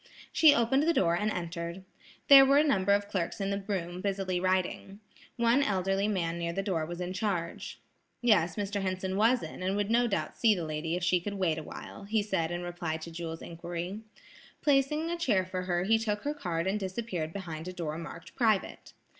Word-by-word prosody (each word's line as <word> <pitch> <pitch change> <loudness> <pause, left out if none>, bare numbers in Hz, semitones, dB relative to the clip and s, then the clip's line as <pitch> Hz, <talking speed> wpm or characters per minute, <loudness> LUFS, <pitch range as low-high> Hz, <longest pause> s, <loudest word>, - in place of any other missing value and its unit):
She 310 -3 +6
opened 235 +4 +3
the 330 +2 +2
door 170 -2 +3
and 210 +4 0
entered. 170 -1 -4 0.4
There 275 -1 +10
were 275 +1 +5
a 295 - +6
number 200 -10 +2
of 200 0 +2
clerks 185 -2 -3
in 195 0 -1
the 200 0 -2
room 180 -3 -4
busily 195 -2 -1
writing. 185 +2 -1 0.4
One 235 +3 +3
elderly 195 -3 +1
man 170 -5 -1
near 170 0 -2
the 195 - -2
door 170 -6 -1
was 175 +1 -6
in 180 0 -3
charge. 185 -4 -3 0.4
Yes, 180 -9 +3
Mr. 205 0 -2
Henson 185 0 -2
was 230 +5 +3
in - - -8
and 190 +2 0
would 205 +1 -1
no 240 +1 +4
doubt 170 -8 -2
see 220 -3 +4
the 170 -3 -3
lady 155 +2 -2
if 180 - -3
she 180 0 +2
could 205 +3 -4
wait 170 -5 0
awhile, 180 +5 -9
he 215 +1 +1
said 190 -6 -1
in 175 0 -4
reply 175 -2 -3
to 160 +1 -9
Jewel's 165 -1 -6
inquiry. 175 +3 -5 0.6
Placing 300 +3 +2
a 345 - -2
chair 210 - +2
for 185 0 -4
her 175 -1 0
he 225 +3 +3
took 210 -2 -2
her 290 - -1
card 175 - -3
and 195 +3 0
disappeared 190 -4 -3
behind 165 -3 -6
a - - -4
door 165 -3 -4
marked 170 0 -9
"Private." 220 -5 0
190 Hz, 205 wpm, -30 LUFS, 170-210 Hz, 0.6 s, There